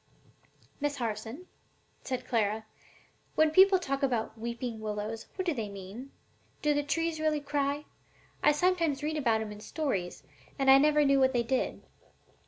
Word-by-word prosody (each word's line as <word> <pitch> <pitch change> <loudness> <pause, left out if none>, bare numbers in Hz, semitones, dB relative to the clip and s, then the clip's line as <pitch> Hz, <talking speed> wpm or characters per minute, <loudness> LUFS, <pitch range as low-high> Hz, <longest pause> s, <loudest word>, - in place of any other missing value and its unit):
'" - - -33
"Miss 290 0 0
Harson," 230 - -4 0.6
said 255 -1 -4
Clara, 220 -2 0 0.7
"when 315 0 +4
people 380 +3 +7
talk 275 -6 -3
about 240 -5 0
weeping 235 0 -5
willows, 215 +1 -4
what 375 - -3
do 340 - +1
they 225 -6 -4
mean? 200 +7 -9 0.5
Do 300 0 +3
the 290 - +1
trees 325 +2 -1
really 310 -1 +1
cry? 285 0 -1 0.6
I 295 - +6
sometimes 325 -3 +1
read 310 +1 -1
about 230 -7 +1
'em 215 -1 -5
in 210 - -9
stories, 200 - -3 0.3
and 270 -1 +5
I 270 - +9
never 300 +1 +4
knew 275 0 +4
what 260 0 +4
they 240 -1 +2
did." 255 +2 -1
270 Hz, 165 wpm, -30 LUFS, 225-300 Hz, 0.7 s, I